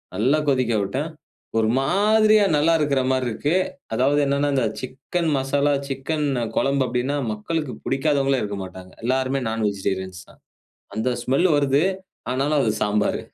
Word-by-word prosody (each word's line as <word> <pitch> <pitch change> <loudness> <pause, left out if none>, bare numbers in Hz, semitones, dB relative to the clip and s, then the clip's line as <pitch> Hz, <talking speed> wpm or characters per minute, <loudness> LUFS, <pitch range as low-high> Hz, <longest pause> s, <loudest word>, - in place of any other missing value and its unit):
நல்லா 130 +9 +2
கொதிக்க 130 -4 +1
விட்டேன். 135 +11 -2 0.5
ஒரு 110 -1 +3
மாதிரியா 215 +7 +4
நல்லா 155 +3 +3
இருக்கிற 140 -3 +1
மாரி 130 -1 +1
இருக்கு. 145 +8 -1 0.4
அதாவது 135 +5 +2
என்னன்னா, 140 +1 +1
இந்த 130 -3 +2 0.2
சிக்கன் 140 +6 -3
மசாலா, 140 +2 +1
சிக்கன் 145 +3 -2 0.3
கொழம்பு 135 0 +2
அப்டின்னா, 130 +4 -1
மக்களுக்கு 145 +7 -3
புடிக்காதவங்களே 135 -1 +1
இருக்க 100 -1 -4
மாட்டாங்க, 95 0 -10
எல்லாருமே 130 +2 +1
நான் 110 -1 -1
வெஜிடேரியன்ஸ் 95 -2 -4
தான். - - -20 0.5
அந்த 110 +4 0
ஸ்மெல் 140 +8 +2
வருது. 140 +1 +2 0.5
ஆனாலும், 140 +3 +1
அது 110 -4 +1
சாம்பார். 105 0 +1
135 Hz, 140 wpm, -23 LUFS, 115-145 Hz, 0.5 s, மாதிரியா